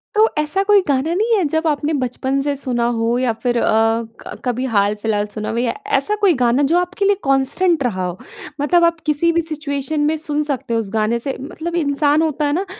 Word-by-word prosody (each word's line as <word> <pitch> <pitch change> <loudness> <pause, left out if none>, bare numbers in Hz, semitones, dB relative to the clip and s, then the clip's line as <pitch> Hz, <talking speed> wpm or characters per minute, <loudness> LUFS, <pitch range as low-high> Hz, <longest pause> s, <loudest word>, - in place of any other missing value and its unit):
तो 435 +1 +5
ऐसा 305 +6 +1
कोई 405 -1 +5
गाना 285 +4 +1
नहीं 440 +4 +2
है 375 - +1
जब 320 +1 0
आपने 300 +1 0
बचपन 260 +2 -2
से 285 0 -1
सुना 250 -3 -2
हो 230 +2 +1
या 250 -2 +1
फ़िर 240 +2 -1
अ, - - +1 0.5
क-कभी 250 +1 -4
हाल 205 -3 +2
फिलहाल 210 -2 0
सुना 215 -1 -4
हो। 225 - -3
व - - 0
या 240 -1 0 0.2
ऐसा 420 - 0
कोई 385 -4 +5
गाना 245 +4 +3
जो 345 - +4
आपके 370 +3 -2
लिए 405 0 +4
कांस्टेंट 275 +4 +1
रहा 190 -7 -1
हो 180 0 -4 0.4
मतलब 345 +3 +3
आप 335 -1 +1
किसी 305 +3 +2
भी 335 0 +1
सिचुएशन 305 -1 -3
में 305 +2 +2
सुन 300 -1 -1
सकते 270 -5 -2
हो 230 - +2
उस 205 -3 -4
गाने 220 +2 +1
से 270 +2 -3
मतलब 335 +4 -6
इंसान 295 -1 +2
होता 305 -2 0
है 290 - 0
ना 375 +4 -1
290 Hz, 225 wpm, -19 LUFS, 245-330 Hz, 0.5 s, तो